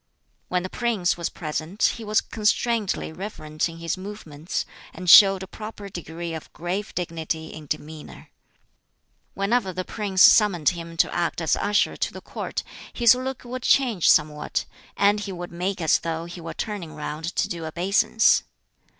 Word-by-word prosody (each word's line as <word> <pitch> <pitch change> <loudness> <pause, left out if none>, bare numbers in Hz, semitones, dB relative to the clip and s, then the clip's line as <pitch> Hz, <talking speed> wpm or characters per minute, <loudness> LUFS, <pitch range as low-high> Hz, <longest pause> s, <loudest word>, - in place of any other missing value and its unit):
When 180 -1 -1
the 185 - -4
prince 225 -7 0
was 170 -1 -3
present 160 +5 -1
he 230 - -8
was 215 0 +2
constrainedly 215 -4 0
reverent 170 -6 -3
in 165 - -10
his 165 +2 -3
movements, 180 -5 -5 0.3
and 185 - -7
showed 195 +1 +8
a - - -8
proper 210 -1 -8
degree 170 -2 -6
of 160 - -8
grave 185 +5 -4
dignity 160 -2 -3
in 155 -1 -10
demeanor. 155 +1 -7 1.0
Whenever 195 +1 +1
the 185 +1 -4
prince 200 -3 +1
summoned 185 -8 +6
him 170 -1 -7
to - - +2
act 170 -1 -1
as 160 -2 +2
usher 205 0 +1
to - - -2
the - - -7
Court, - - -5 0.3
his 235 -1 +6
look 255 +1 -4
would 250 +1 -5
change 240 - +3
somewhat, 150 0 +2 0.3
and 205 +1 +4
he 200 -1 -5
would 175 -1 -7
make 185 +3 -3
as 160 -3 +3
though 165 0 -3
he 175 0 -9
were 165 - -7
turning 185 -8 -5
round 155 +3 -5
to - - +1
do 170 -2 -5
obeisance. 195 +6 +3
180 Hz, 165 wpm, -24 LUFS, 165-210 Hz, 1.0 s, showed